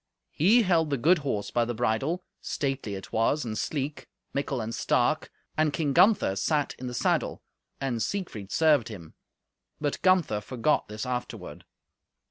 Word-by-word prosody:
He 215 +10 +4
held 165 -5 +2
the 140 - 0
good 165 +8 +4
horse, 135 -8 -2
by 120 - +2
the 120 0 -3
bridle; 135 +10 0 0.2
stately 135 -7 -2
it 95 - -9
was 120 +6 +1
and 110 -2 -3
sleek, 145 +4 -3 0.3
mickle 140 -1 -1
and 115 0 -4
stark, - - +1 0.3
and 155 -1 +2
King 145 -2 -1
Gunther 190 - +4
sat 145 +8 0
in 130 - -5
the 125 - -5
saddle, - - 0 0.4
and 125 -4 -2
Siegfried 110 - -4
served 150 -7 +4
him; 90 -8 -9 0.7
but 145 -2 -2
Gunther 180 - +3
forgot 130 +7 0
this 105 +3 -5
afterward. 125 -1 -5
135 Hz, 155 wpm, -27 LUFS, 115-155 Hz, 0.7 s, He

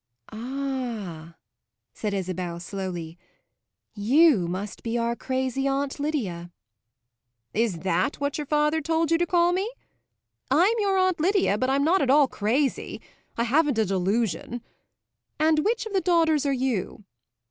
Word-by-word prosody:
"Ah," 230 - -5 0.6
said 210 - -3
Isabel 185 -3 -3
slowly, 175 -3 -6 0.7
"you 240 - +4
must 190 +4 -5
be 230 0 -2
our 235 0 0
crazy 260 +1 -2
Aunt 275 +1 -1
Lydia!" 200 - -3 1.0
"Is 210 -7 0
that 185 - 0
what 285 +1 -2
your 295 - -4
father 300 +2 +2
told 325 +2 0
you 330 - +3
to 345 - +1
call 345 0 +3
me? 390 +5 -1 0.8
I'm 345 - +4
your 395 -2 +2
Aunt 370 -2 +2
Lydia, 370 - +2
but 255 - +1
I'm 275 +1 +2
not 350 +6 +3
at 270 - +1
all 285 +1 +6
crazy: 255 +6 -1 0.4
I 235 - +2
haven't 280 +2 +2
a 220 - +3
delusion! 195 +4 -1 0.8
And 310 0 +3
which 445 +8 0
of 440 - -7
the 385 - +2
daughters 325 -5 +2
are - - +2
you?" 250 -7 -2
265 Hz, 145 wpm, -25 LUFS, 200-310 Hz, 1.0 s, all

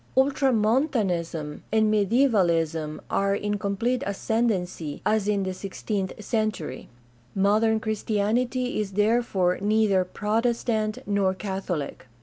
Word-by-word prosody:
Ultramontanism 220 - +1
and 220 0 +3
Mediaevalism 175 - +2
are 195 0 +2
in 205 0 -2
complete 230 +6 -1
ascendency, 195 -7 -1
as 215 -2 +2
in 205 -2 +1
the 185 0 -2
sixteenth 195 0 -4
century. 215 - -2 0.5
Modern 215 +3 +3
Christianity 220 +4 -1
is 200 -2 -5
therefore 205 -4 +2
neither 205 -2 +3
Protestant 215 +2 -1
nor 195 -2 +1
Catholic. 190 -9 -4
205 Hz, 100 wpm, -25 LUFS, 190-225 Hz, 0.5 s, and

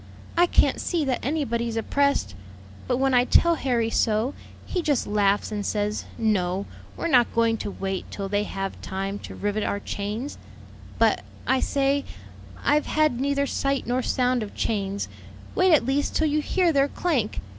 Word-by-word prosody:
I 350 +1 +5
can't - - +3
see 335 -4 0
that 260 -2 -1
anybody's 235 -5 -1
oppressed; 280 - +1 0.5
but 250 - +1
when 270 0 +2
I 245 0 +5
tell 340 +6 +4
Harry 240 -7 0
so, 225 +5 +1 0.3
he 360 - -2
just 290 -5 +1
laughs 205 0 +1
and 210 -1 -2
says, 210 0 -1
'No, 195 -3 0 0.3
we're - - -2
not 250 -7 +4
going 230 -1 +3
to 205 - -4
wait 195 -1 -4
till 200 -1 -4
they 205 +1 0
have 195 -1 -5
time 195 +1 -4
to - - -9
rivet 205 +1 -1
our 200 - -1
chains,' 210 +8 -4 0.6
'But,' - - +3 0.2
I 265 - +2
say, 280 +1 +1 0.6
'I've 295 +1 +2
had 305 -6 +2
neither 280 0 +1
sight 275 -1 -1
nor 245 +2 0
sound 250 0 +1
of 210 - -6
chains; 200 -2 -1 0.5
wait 370 0 +4
at 295 -7 +5
least 275 +2 0
till 315 - +3
you 300 +1 +1
hear 350 +1 +2
their 275 -1 +4
clank.' 280 -9 -1
245 Hz, 170 wpm, -25 LUFS, 205-280 Hz, 0.6 s, I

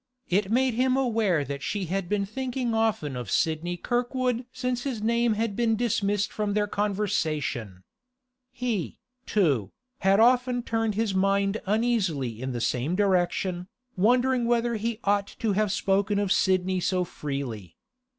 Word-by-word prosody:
It 195 +2 +1
made 255 +1 +3
him 255 +2 +2
aware 220 - +1
that 140 +1 -5
she 200 +4 -2
had 180 +1 -3
been 205 -1 0
thinking 250 +1 -3
often 220 - 0
of 120 -5 -5
Sidney 165 - 0
Kirkwood 245 +2 -1
since 250 -1 -2
his 255 -4 -3
name 235 0 +2
had 220 -1 -1
been 230 -1 +2
dismissed 205 -3 0
from 210 -1 -1
their 210 -1 +2
conversation. 155 - -2 0.7
He, 235 -8 -3 0.3
too, 140 - +2 0.3
had 195 +1 +3
often 245 +1 +3
turned 225 -2 -1
his 220 -2 0
mind 195 +2 +1
uneasily 190 - 0
in 130 0 -3
the 120 - -3
same 125 +8 0
direction, 185 -2 +1 0.3
wondering 245 +5 +3
whether 235 0 +1
he 225 +1 -2
ought 200 0 +2
to 225 - 0
have 210 0 +1
spoken 200 +1 +1
of 200 -2 0
Sidney 185 -1 +2
so 180 0 +1
freely. 135 - -5
205 Hz, 150 wpm, -26 LUFS, 180-235 Hz, 0.7 s, made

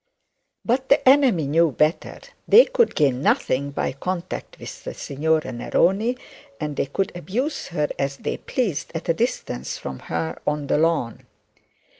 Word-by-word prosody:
But 260 +3 0
the 280 - +3
enemy 260 - +5
knew 160 +3 +3
better. 155 +5 0 0.3
They 480 +3 +8
could - - +1
gain 135 -4 +2
nothing 140 -1 +1
be 140 - -2
contact 180 +5 -5
with - - -9
the - - -6
signora 155 +3 -1
Neroni, 195 - +1 0.4
and 150 -1 -3
they - - -1
could 190 +8 -2
abuse 230 - -3
her 150 -4 -1
as 140 0 -1
they - - -3
pleased 210 - -2
at 165 +1 -5
a - - +5
distance 225 - -3
from 65 -1 -7
her 80 0 -4
on 150 -1 0
the 145 - +1
lawn. 160 -8 0
160 Hz, 155 wpm, -23 LUFS, 140-225 Hz, 0.4 s, They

